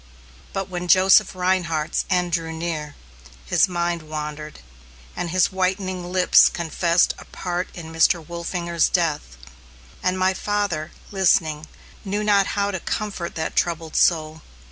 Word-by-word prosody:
But 195 -1 -3
when 180 -1 -5
Joseph 185 +1 +5
Rhinehart's 180 -4 0
end 180 -2 +1
drew 165 -1 -1
near, 160 -3 -4 0.5
his 60 - +3
mind 175 -1 -1
wandered, 150 - -7 0.5
and 175 - -3
his 185 +2 +2
whitening 185 -1 -2
lips 185 -1 +6
confessed 170 +1 +1
a - - -12
part 180 0 -4
in 160 -2 -9
Mr. 165 +2 +4
Wolfinger's 170 -1 -1
death; 155 - -1 0.6
and 185 0 0
my 185 0 +2
father, 195 -6 -2 0.2
listening, 160 -5 +1 0.4
knew 205 +1 -2
not 200 -2 +3
how 200 0 +1
to 190 - -3
comfort 195 -2 -4
that 160 0 -3
troubled 165 -2 -1
soul. 160 -2 +2
175 Hz, 135 wpm, -22 LUFS, 160-185 Hz, 0.6 s, lips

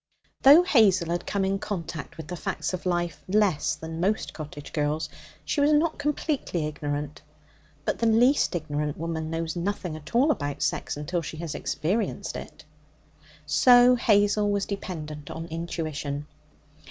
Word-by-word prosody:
Though 290 +6 +9
Hazel 200 - +4
had 175 0 -2
come 200 -1 0
in 195 +1 0
contact 170 -7 -5
with 160 -2 -8
the 180 - -5
facts 160 -1 -3
of 185 0 -3
life 175 -2 -1
less 190 -7 +2
than 160 +1 -7
most 200 +5 0
cottage 145 -2 -8
girls, 150 0 -1 0.4
she 290 - 0
was 290 +1 +4
not 305 +1 +2
completely 285 - -1
ignorant. 145 -1 -4 0.6
But - - -1
the 230 - +2
least 235 0 +4
ignorant 150 -2 -2
woman 160 -1 -3
knows 165 0 -3
nothing 180 -2 -3
at 155 +7 -10
all 275 +6 +5
about 145 - -2
sex - - -1
until 170 +4 -2
she 160 - -7
has 165 -1 -4
experienced 200 +8 -2
it. - - -9 0.8
So 245 0 +6
Hazel 205 -2 +3
was 200 -1 0
dependent 155 -7 -6
on 165 - -5
intuition. 155 -3 -4
170 Hz, 155 wpm, -26 LUFS, 155-210 Hz, 0.8 s, Though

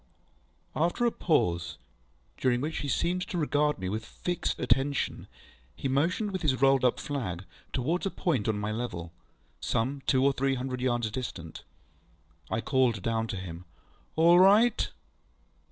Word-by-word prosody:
After 175 +9 +1
a 235 - +3
pause, 85 - 0 0.6
during 125 -2 +2
which 155 +4 -3
he 145 - -3
seemed 175 +6 0
to 180 - -4
regard 150 -1 +1
me 95 - -4
with 110 +4 -2
fixed 175 +8 -3
attention, 135 +3 0 0.5
he - - -3
motioned 170 +10 +1
with 185 -2 -3
his 135 -6 +1
rolled 135 0 +4
up 125 - +3
flag 95 -11 -4 0.3
towards 160 +10 0
a - - 0
point 155 - -1
on 110 -2 +1
my 105 +1 -2
level, 90 -8 -4 0.5
some 135 +5 -1
two 130 0 +3
or 140 - +4
three 135 0 +1
hundred 125 0 -4
yards 120 -3 0
distant. 95 -9 -6 0.9
I 110 - -1
called 125 -7 +1
down 115 -1 0
to 95 - -4
him, 90 -1 -7 0.5
ŌĆ£All 170 +2 +7
right! 210 +5 +5
130 Hz, 155 wpm, -29 LUFS, 110-155 Hz, 0.9 s, ŌĆ£All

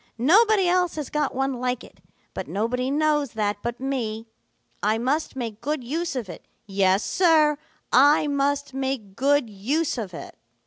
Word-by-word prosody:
Nobody 390 - +4
else 360 -1 +2
has 300 -4 -5
got 300 -3 -1
one 270 +1 0
like 250 0 -2
it, - - -16 0.3
but - - -5
nobody 250 +5 -1
knows 295 -2 +1
that 210 -2 -1
but 235 0 -4
me. 230 -5 -3 0.5
I 215 +2 +1
must 265 +7 -1
make 230 -4 -5
good 290 +1 -2
use 325 +6 -3
of 240 -6 -3
it. 175 - -10 0.2
Yes, 195 0 +2
Sir, 310 -5 +3 0.3
I 290 +4 +6
must 285 -1 -1
make 265 -7 -3
good 280 0 +2
use 250 +9 -1
of 190 -6 -6
it.' - - -9
265 Hz, 165 wpm, -24 LUFS, 225-300 Hz, 0.5 s, I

